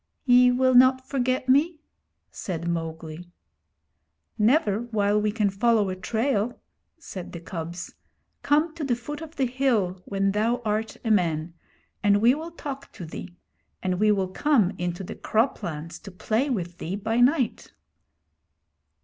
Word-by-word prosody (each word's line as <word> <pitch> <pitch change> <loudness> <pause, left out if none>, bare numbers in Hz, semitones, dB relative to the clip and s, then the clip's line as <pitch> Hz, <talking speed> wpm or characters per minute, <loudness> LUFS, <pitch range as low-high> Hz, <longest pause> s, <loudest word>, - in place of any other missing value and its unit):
'Ye 250 -1 +6
will 255 +1 +3
not 260 +1 +5
forget 255 -1 -1
me?' 300 +5 +3 0.5
said 170 -3 -5
Mowgli. 165 0 -4 1.1
'Never 215 -2 +3
while 210 -3 +1
we 210 0 +1
can 210 -2 +1
follow 215 0 +2
a - - -3
trail,' 225 +3 -1 0.4
said 190 - -8
the 170 - -6
cubs. 170 0 -6 0.5
'Come 305 +2 +2
to 330 -2 -6
the 255 -4 +1
foot 290 +6 -7
of 320 0 -9
the 270 - +1
hill 235 -8 0
when 195 0 0
thou 225 +4 +1
art 215 +1 -1
a 225 - +1
man, 165 -4 +1 0.5
and 205 -1 +4
we 235 +4 +5
will 315 +4 -5
talk 280 -4 -7
to 180 - -8
thee; 175 +2 -9 0.5
and 185 -1 -1
we 215 0 +4
will 190 -3 0
come 220 -3 +2
into 175 +1 -3
the - - -6
crop 225 +5 0
lands 165 0 -6
to 200 - -10
play 220 +8 -1
with 175 -8 -3
thee 175 +4 -3
by 220 +3 -1
night.' 255 -1 +2
215 Hz, 155 wpm, -25 LUFS, 185-255 Hz, 1.1 s, Ye